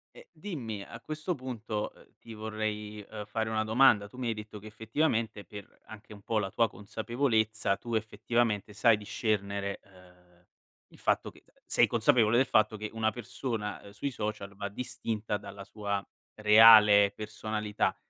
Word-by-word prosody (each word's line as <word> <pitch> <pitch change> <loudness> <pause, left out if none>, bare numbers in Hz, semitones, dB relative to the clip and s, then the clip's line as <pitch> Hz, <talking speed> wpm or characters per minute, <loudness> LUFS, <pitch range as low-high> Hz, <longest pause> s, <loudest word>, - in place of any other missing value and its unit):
Ehm, - - -13
dimmi, 120 - -6
a 115 - -10
questo 155 +6 -4
punto, 115 -5 -4
uhm, - - -21
ti 115 - -11
vorrei, 105 -1 -4
uhm, 105 -1 -7
fare 110 +1 -2
una 110 -1 0
domanda. 110 -2 +4
Tu 125 - -16
mi 125 - -3
hai 115 - +1
detto 105 0 -9
che, 105 - -15
effettivamente, 110 - -1
per 100 +2 -12
anche 110 0 -12
un 100 - -13
po' 110 0 0
la 95 -2 -2
tua 115 +4 +2
consapevolezza, 110 -1 -1
tu 120 -1 -7
effettivamente 110 -1 -1
sai 110 +1 +4
discernere, 100 -2 -2
uhm, 90 -2 -22 0.5
il - - -17
fatto - - 0
che - - -19
t - - -30
sei - - +3
consapevole 115 -1 +3
del 130 - +3
fatto 110 -1 +3
che 105 0 -5
una 110 -1 0
persona, 120 -3 -4
uhm, 100 - -12
sui 120 +7 -3
social 105 -4 -5
va 100 0 -4
distinta 110 -2 -3
dalla 100 -1 -10
sua 100 0 -3 0.3
reale 105 -1 +8
personalità. 105 0 -2
110 Hz, 165 wpm, -30 LUFS, 105-115 Hz, 0.5 s, reale